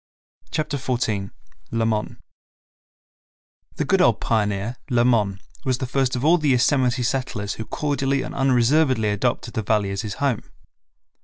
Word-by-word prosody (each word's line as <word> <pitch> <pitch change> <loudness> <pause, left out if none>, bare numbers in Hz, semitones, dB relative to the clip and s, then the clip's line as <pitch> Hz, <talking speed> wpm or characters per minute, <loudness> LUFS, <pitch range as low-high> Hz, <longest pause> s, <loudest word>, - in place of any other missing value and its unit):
Chapter 150 -2 -2
14 110 -6 -1 0.4
Lamon 110 -2 -1 1.6
The - - -1
good - - +3
old - - +4
pioneer, 105 +1 -1
Lamon, 120 -6 +2 0.2
was 130 -2 0
the 130 - -3
first 130 0 0
of 125 +3 -2
all 170 +3 +5
the 150 - -1
early - - +4
Yosemite 125 -1 +2
settlers 120 -6 -2
who 110 - -6
cordially 140 -1 -1
and - - -6
unreservedly 130 -2 +3
adopted 120 +3 -1
the 110 - -1
Valley 105 -1 +1
as 100 - -2
his 105 -2 -5
home. 140 -5 0
120 Hz, 145 wpm, -23 LUFS, 110-135 Hz, 1.6 s, all